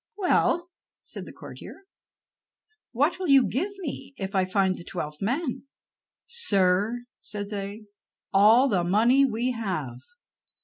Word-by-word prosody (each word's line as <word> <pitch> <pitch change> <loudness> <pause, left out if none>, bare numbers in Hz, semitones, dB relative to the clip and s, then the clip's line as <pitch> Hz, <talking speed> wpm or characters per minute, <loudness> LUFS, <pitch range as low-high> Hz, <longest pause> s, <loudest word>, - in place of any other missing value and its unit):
"Well," 355 -2 +1 0.3
said - - -7
the - - -8
courtier, 390 - -11 1.1
"what 290 +9 +1
will 370 - -2
you 275 -3 +6
give 355 - -1
me 280 -3 -6
if 195 0 -5
I 190 -2 +2
find 190 0 +2
the 175 - -10
twelfth 150 -4 -6
man?" 260 - -2 0.6
"Sir," 210 - +1
said 205 0 -6
they, 200 +1 -5 0.5
"all 220 +7 +6
the 190 -8 +1
money 230 +10 +4
we 245 0 -1
have." 185 - -3
220 Hz, 130 wpm, -26 LUFS, 195-275 Hz, 1.1 s, you